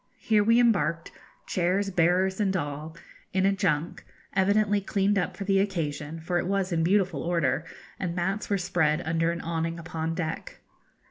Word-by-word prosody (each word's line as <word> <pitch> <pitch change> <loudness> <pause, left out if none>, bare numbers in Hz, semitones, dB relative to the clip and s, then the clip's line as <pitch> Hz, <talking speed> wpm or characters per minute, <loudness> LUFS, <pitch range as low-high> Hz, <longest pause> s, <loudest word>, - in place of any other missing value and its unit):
Here 215 -2 +2
we 230 +3 +4
embarked 210 -8 +2 0.3
chairs, 190 +3 0
bearers, 180 +2 +2
and 195 -2 +1
all, 150 +1 -5 0.4
in 190 0 +2
a 195 - +4
junk, 185 -5 -1 0.3
evidently 205 +1 +3
cleaned 200 0 +1
up 180 0 -3
for - - -4
the 195 0 +2
occasion, 165 -5 -2
for 175 +2 -1
it 175 - -2
was 195 -1 0
in 165 -1 +1
beautiful 190 +1 +2
order, 165 -3 0 0.3
and 175 -2 -2
mats 190 +4 -2
were 200 - +2
spread 160 -4 +1
under 165 +1 +1
an 170 - -4
awning 165 0 -2
upon 165 -1 -4
deck. 175 - -5
180 Hz, 165 wpm, -27 LUFS, 165-195 Hz, 0.4 s, we